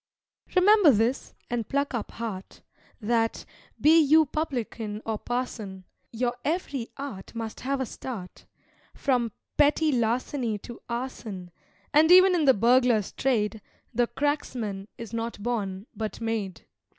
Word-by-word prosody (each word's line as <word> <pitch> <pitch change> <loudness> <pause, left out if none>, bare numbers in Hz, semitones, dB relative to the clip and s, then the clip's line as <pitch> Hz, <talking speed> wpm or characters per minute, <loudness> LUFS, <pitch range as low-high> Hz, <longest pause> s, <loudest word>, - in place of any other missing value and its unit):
Remember 395 -1 +6
this, 235 +1 +1
and 235 -3 -3
pluck 280 0 0
up 235 -3 -3
heart, 210 -5 -6 0.4
That, 225 0 0 0.3
be 320 +2 +6
you 315 +1 +6
publican 235 -8 -3
or 220 -2 -2
parson, 220 -6 -4 0.3
Your 240 +1 -1
ev'ry 285 -7 -2
art 235 -8 -7
must 225 -1 -5
have 275 +2 -1
a 260 - 0
start, 220 -6 -8 0.5
From 245 -5 +1 0.3
petty 300 +1 +4
larceny 240 -1 0
to 235 +3 -11
arson; 225 -7 -5 0.4
And 315 +3 +6
even 370 +1 +8
in 330 -4 +2
the 265 - +6
burglar's 235 -1 +3
trade, 220 -4 0 0.3
The 240 +1 +2
cracksman 235 -10 -2
is 230 -1 -8
not 230 -1 -3
born, 200 -5 -2
but 220 -1 -4
made. 225 -5 -3
240 Hz, 130 wpm, -27 LUFS, 220-275 Hz, 0.5 s, even